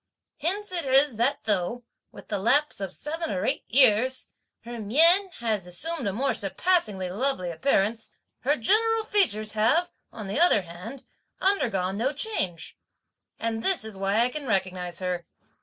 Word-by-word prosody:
Hence 400 +4 -2
it 350 -2 -2
is 270 -2 +4
that 245 +5 0
though, 210 +4 -1 0.3
with - - -14
the 205 - -1
lapse 275 +4 +1
of 195 -2 -3
seven 320 - -5
or 185 -1 -2
eight - - -1
years, 255 +1 +4 0.3
her 235 0 -8
mien 330 - +4
has 215 -6 -1
assumed 290 - -2
a - - 0
more 255 +8 0
surpassingly 205 - 0
lovely 205 -4 -1
appearance, 220 - 0 0.3
her 285 +3 +1
general 445 - +2
features 335 - +1
have, 230 - +2 0.2
on 215 - -8
the 195 +9 -2
other 335 - +4
hand, 185 +11 -10 0.4
undergone 200 - +1
no 260 +6 0
change; 190 - -4 0.6
and 225 0 -3
this 375 -4 0
is 220 -2 -6
why 195 +3 +1
I 240 - +3
can 285 +1 -6
recognise 185 -4 -1
her. 180 -2 -3
230 Hz, 155 wpm, -26 LUFS, 195-300 Hz, 0.6 s, is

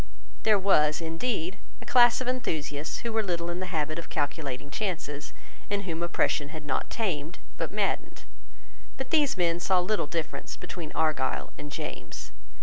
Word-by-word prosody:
There 215 -2 +5
was, 150 -6 +4
indeed, 175 +3 -1 0.2
a - - -10
class 245 0 +7
of 255 - -3
enthusiasts 155 - -1
who 235 -1 -2
were 220 - +3
little 175 -4 -1
in 175 - -3
the 185 - -2
habit 155 -2 -1
of 170 - -8
calculating 145 -2 -2
chances, 155 -7 -2 0.4
and 200 0 0
whom 170 -3 -3
oppression 160 -3 +1
had 155 -1 -7
not 140 - -1
tamed 175 -7 -1 0.2
but - - -2
maddened. - - -1 0.7
But 265 - -4
these 295 - +4
men 170 -1 +3
saw 185 +1 +4
little 185 -2 +1
difference 160 0 -3
between 170 -3 -6
Argyle 155 -4 +1
and 150 - -7
James. - - -5
170 Hz, 160 wpm, -29 LUFS, 150-200 Hz, 0.7 s, class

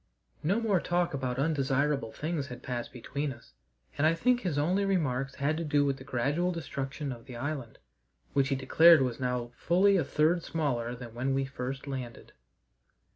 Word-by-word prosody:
No 190 +9 +1
more 210 -5 +2
talk 175 -1 0
about 130 -2 -2
undesirable 140 -3 +1
things 155 -2 -3
had 125 -2 -9
passed 120 -2 -4
between 140 +4 -4
us, 120 -2 -13 0.5
and 155 - +5
I 165 - +3
think 245 +8 +2
his 170 -6 -2
only 180 +7 +2
remarks 140 -9 0
had 145 +3 0
to 165 - -2
do 145 -2 +2
with 135 -1 0
the 130 - -11
gradual 140 +7 0
destruction 140 -3 -4
of 115 -2 -9
the 125 - -8
island, 135 -2 -4 0.6
which 140 -1 +3
he 135 - +1
declared 155 +3 +6
was 125 -1 -2
now 125 -2 -2
fully 195 +3 +3
a 170 - +2
third 155 +5 +2
smaller 125 -8 -2
than 120 -2 -9
when 130 +3 -1
we 135 0 +1
first 135 0 -5
landed. 130 -4 -6
140 Hz, 180 wpm, -30 LUFS, 130-165 Hz, 0.6 s, declared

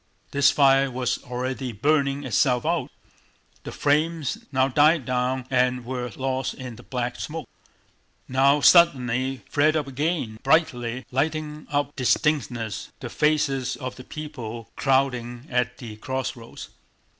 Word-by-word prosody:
This 140 0 +4
fire 135 -1 +4
was 125 -1 -1
already 125 +1 -3
burning 140 +4 +1
itself 125 +1 +1
out. 165 0 0 0.8
The - - -5
flames 155 0 0
now 130 -1 +3
died 150 +1 +4
down 125 +1 -1
and 125 -1 +1
were 125 0 -3
lost 130 0 -2
in 130 -4 -8
the - - -13
black 125 -1 -3
smoke, 160 +1 -5 0.8
now 135 +3 +3
suddenly 130 -7 +4
flared 155 +2 +2
up 155 -2 0
again 140 -5 -2
brightly, 130 -5 +1
lighting 150 +2 -2
up 145 0 0
with 130 -3 -1
strange 150 -6 +2
distinctness 115 -3 -6
the 120 -4 -7
faces 150 -4 +1
of 130 -2 -6
the 125 - -10
people 120 -7 -7
crowding 125 -3 0
at 125 0 0
the 110 -4 -9
crossroads. 130 -1 -5
130 Hz, 135 wpm, -24 LUFS, 125-145 Hz, 0.8 s, This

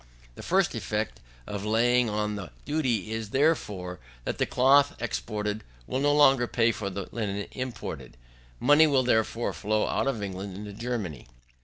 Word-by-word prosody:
The - - -10
first - - +2
effect - - -3 0.3
of 100 -1 -5
laying 120 +2 +3
on 105 0 -1
the 100 -4 -6 0.2
duty 125 - 0
is, 110 0 -2
as - - -13
before, 105 - 0 0.2
that - - -3
the - - +2
cloth 140 +3 +4
exported 105 -2 -3 0.2
will 130 - -2
no 145 +1 +3
longer 135 -4 +5
pay 115 -1 +2
for 105 -3 -4
the 100 0 -5
linen 100 -3 -3
imported. 100 - -6 0.4
Money 145 +4 +6
will, 135 -3 +3
therefore, 115 -1 +1
flow 110 0 0
out - - 0
of 115 -7 -1
England 95 0 -5
into 105 0 -7
Germany. 100 - -4
110 Hz, 165 wpm, -27 LUFS, 100-125 Hz, 0.4 s, Money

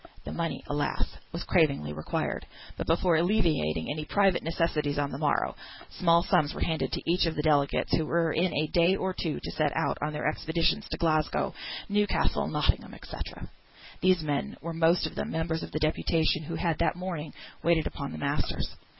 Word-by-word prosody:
The - - -5
money, 165 -1 -3
alas, 145 0 -2
was 170 - -4
cravingly 140 - +2
required; 75 0 -3 0.3
but - - -4
before 165 0 +3
alleviating 160 - +1
any 155 +1 -3
private 195 +3 +3
necessities 155 -3 0
on 145 -1 0
the 135 - -5
morrow, 150 -2 +1 0.4
small 170 -1 +3
sums 165 -6 +2
were - - -6
handed 160 -1 -1
to - - -2
each 175 +1 +3
of 160 - -2
the 150 - -1
delegates, 145 -2 +2
who 155 - 0
were 165 -1 +2
in 175 +2 +2
a 155 +2 0
day 175 +2 +5
or 190 -1 -1
two 160 -4 -2
to - - -6
set 150 -2 +1
out - - 0
on 150 +1 -1
their 150 0 -4
expeditions 165 +6 0
to - - -3
Glasgow, 155 -3 +1 0.3
Newcastle, 205 0 +1
Nottingham, - - 0
&c. - - -8 0.9
These 185 -3 +4
men 145 -2 -2
were 165 +1 -5
most 165 +1 +3
of - - -4
them - - -3
members 160 0 -1
of - - -7
the - - -2
deputation 155 0 +1
who 165 - -4
had 165 -1 0
that 170 - +2
morning 175 -4 -4 0.3
waited 165 -1 +3
upon 140 - -4
the - - -6
masters. 75 - -2
160 Hz, 190 wpm, -29 LUFS, 150-170 Hz, 0.9 s, day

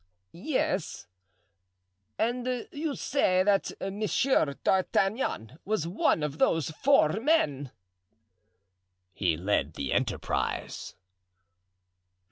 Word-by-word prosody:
"Yes. 190 - -2 1.1
And 245 +1 -1
you 295 -1 -3
say 185 -10 +2
that 200 0 +2
Monsieur 200 - +1
d'Artagnan 190 - 0
was 200 -5 -1
one 170 -3 +1
of 150 0 -3
those 160 -2 +2
four 215 - +3
men?" 150 - +1 1.4
"He 85 -5 0
led 85 -5 0
the 70 - -2
enterprise." - - -2
190 Hz, 85 wpm, -28 LUFS, 145-245 Hz, 1.4 s, four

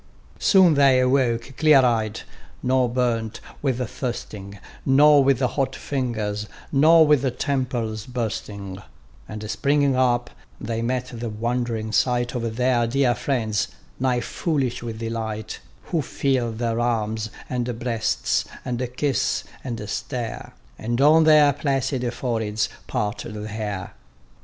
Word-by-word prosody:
Soon 190 -5 +5
they 140 -3 +5
awoke 125 -1 +1
clear 150 -4 +6
eyed: 110 -3 0 0.4
nor 130 -1 +2
burnt 115 -3 -1 0.2
with 130 -3 -1
thirsting, 105 -6 -6 0.3
Nor 145 +1 +6
with 135 -2 +3
hot 135 +1 0
fingers, 110 -6 -3 0.2
nor 160 +3 +6
with 135 -4 +2
temples 120 -6 -2
bursting: 105 -5 -4 0.5
And 105 0 -6
springing 140 +6 +2
up, 120 -1 +1 0.3
they 115 +1 -3
met 125 +2 -2
the 120 0 -4
wond'ring 115 0 -2
sight 120 +1 +1
Of 115 -3 -3
their 125 -1 +2
dear 125 0 +2
friends, 110 -6 -1 0.3
nigh 125 -1 +1
foolish 135 -4 -2
with 115 -2 -5
delight; 110 -1 -4 0.3
Who 165 -3 +2
feel 130 -4 0
their 115 0 -2
arms, 110 -2 -1 0.2
and 125 -2 -2
breasts, 115 -2 0 0.2
and 125 0 -2
kiss 145 -3 0 0.2
ans 115 -4 -5
stare, 120 -4 -4 0.3
And 120 +2 -2
on 155 +3 +6
their 150 -2 +6
placid 135 -3 -1
foreheads 110 -4 -1 0.2
part 105 +3 -2
the 105 -1 -6
hair. 105 -3 -5
120 Hz, 125 wpm, -23 LUFS, 110-135 Hz, 0.5 s, clear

